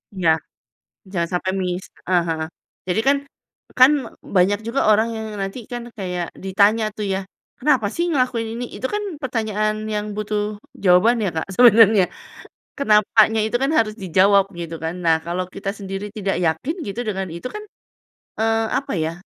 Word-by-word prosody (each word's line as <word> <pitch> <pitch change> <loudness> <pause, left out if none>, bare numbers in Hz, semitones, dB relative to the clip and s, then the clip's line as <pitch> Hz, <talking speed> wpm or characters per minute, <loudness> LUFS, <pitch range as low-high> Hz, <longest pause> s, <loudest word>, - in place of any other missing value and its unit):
Iya. 180 -3 +2 0.8
Jangan 170 -3 -1
sampai 185 +1 -1
missed. 180 0 -3 0.2
Heeh 180 -1 +3
heeh. 160 -1 -1 0.4
Jadi 180 +4 +1
kan 280 - +5 0.6
kan 255 +2 +9 0.5
banyak 190 +3 +4
juga 235 +4 0
orang 220 +2 +4
yang 220 0 -5
nanti 195 +5 -4
kan 240 0 -4 0.2
kayak 180 -3 -3 0.2
ditanya 200 +3 +3
tuh 210 - -3
ya, 190 - 0 0.4
"Kenapa 265 -6 +2
sih 340 - 0
ngelakuin 250 -6 0
ini?" 240 +1 -4
Itu - - -2
kan 415 - -1 0.2
pertanyaan 215 -4 -1 0.2
yang 210 0 -1
butuh 210 0 -1 0.4
jawaban 190 +6 +5
ya - - +1
Kak, 160 - -1
sebenarnya. 220 -4 +7 0.7
Kenapanya 220 -3 +4
itu 220 - -2
kan 275 - +1
harus 215 -2 +1
dijawab 195 +2 +4 0.2
gitu 170 -1 -5
kan. 160 +1 -2
Nah 165 -1 +5
kalau 175 +2 -2
kita 195 - -4
sendiri 195 0 -5
tidak 195 -2 -1
yakin, 160 - -1
gitu, 200 +4 -5
dengan 190 -2 -2
itu 170 +8 -6
kan, 425 - -6 0.8
eee, 225 0 +2
apa 275 - -6
ya, 160 - -1
210 Hz, 160 wpm, -21 LUFS, 185-225 Hz, 0.8 s, kan